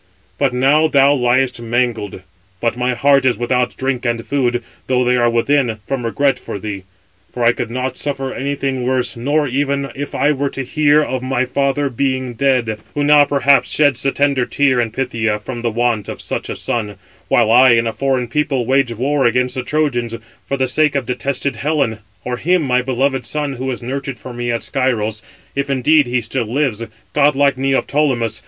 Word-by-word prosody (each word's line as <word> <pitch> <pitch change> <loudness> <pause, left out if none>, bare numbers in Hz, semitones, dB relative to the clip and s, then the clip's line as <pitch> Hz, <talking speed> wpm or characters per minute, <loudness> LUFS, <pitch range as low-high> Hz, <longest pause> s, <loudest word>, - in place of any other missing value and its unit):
But 140 -3 +2
now 135 +5 +3
thou 140 -1 +4
liest 125 -1 +1
mangled; 115 -5 -2 0.4
but 115 +2 0
my 125 0 -1
heart 140 +2 +3
is 130 -2 +2
without 125 -1 0
drink 130 -2 -2
and 120 -1 -2
food, 125 -4 0 0.2
though 125 -1 +2
they 125 0 +2
are 120 -1 +3
within, 120 0 +1
from 135 0 -3
regret 140 +4 +1
for - - -6
thee; 100 -2 -6 0.5
for 120 - -3
I 115 - +6
could 120 - -4
not 130 +2 -3
suffer 135 -2 -3
anything 135 -1 -2
worse, 130 0 0
not 145 +4 0
even 140 +1 -1
if 145 +1 -6
I 145 +3 +2
were 140 -1 -1
to 135 - -5
hear 150 +2 +3
of 130 -3 -3
my 130 0 0
father 140 +2 0
being 130 -1 -2
dead, 120 -4 0 0.2
who 145 - 0
now 145 0 +6
perhaps 140 -1 +3
sheds 145 -5 +2
the 135 - +1
tender 140 -3 +1
tear 135 -3 +2
in 115 - -1
Phthia 115 -3 -1
from 120 +3 -6
the 120 - 0
want 115 -2 -1
of - - -6
such - - -4
a - - -3
son; 105 -3 -3 0.3
while 115 -2 +3
I, 125 +1 +7
in 115 0 +2
a 115 - 0
foreign 130 +1 0
people, 135 -1 -1
wage 135 0 +2
war 135 +3 +1
against 125 +1 0
the 130 - -3
Trojans, 125 -5 -1 0.3
for 140 - -1
the 130 -1 +1
sake 150 +2 +1
of 140 - 0
detested 130 +1 -2
Helen: 140 -4 0 0.2
or 125 0 -3
him, 175 +5 +1
my 125 -2 +2
beloved 130 +1 0
son, 150 -2 -3
who 130 +2 -3
is 125 -1 -4
nurtured 135 +1 -4
for 125 +2 -9
me 120 0 -4
at 115 -1 -1
Scyros, 110 -6 -1 0.3
if 140 0 -2
indeed 140 +2 +3
he 125 0 0
still 115 0 -3
lives, 125 -5 0 0.3
godlike 140 -1 +3
Neoptolemus. 135 -4 0
130 Hz, 195 wpm, -18 LUFS, 120-140 Hz, 0.5 s, I